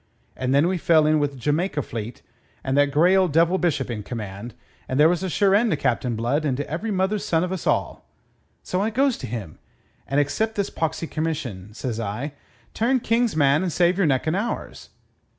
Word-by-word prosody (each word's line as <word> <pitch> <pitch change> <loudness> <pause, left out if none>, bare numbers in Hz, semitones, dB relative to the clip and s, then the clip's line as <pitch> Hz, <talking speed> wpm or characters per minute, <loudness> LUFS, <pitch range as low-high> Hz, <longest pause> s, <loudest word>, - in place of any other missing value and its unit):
And 130 0 -2
then 140 +4 +4
we 185 -1 -1
fell 165 -3 +4
in 155 0 +3
wi' 145 - +2
the 140 - -12
Jamaica 150 +4 -1
fleet 115 +1 -7 0.4
and 135 0 -1
that 145 0 +4
grey 165 +7 +4
old 185 -3 +3
devil 170 +4 +3
Bishop 145 -8 0
in 110 -3 -4
command, 105 0 -7 0.3
and 130 - -1
there 150 - +7
was 175 +1 +1
a 190 - -2
sure 195 +3 +2
end 225 +3 +4
to 155 - +1
Captain 125 -3 0
Blood 120 +7 0
and 135 -4 0
to 145 - -3
every 170 +9 -3
mother's 195 +1 0
son 165 0 +1
of 180 - -3
us 190 -3 -4
all. - - -1 0.5
So 185 - -1
I 215 - +1
goes 265 +3 +2
to 130 - -6
him, 105 -8 -6 0.5
and 140 +2 +1
'accept 220 +10 0
this 200 -1 -1
poxy 165 +1 -2
commission,' 140 - -4
says 115 -2 -4
I; 115 +7 -4 0.4
'turn 250 +3 +1
King's 230 -2 +1
man 145 0 +3
and 185 -2 -1
save 175 +3 +2
your 185 - +3
neck 130 -3 +1
and 160 +2 0
ours.' 215 +5 -4
155 Hz, 215 wpm, -23 LUFS, 130-185 Hz, 0.5 s, there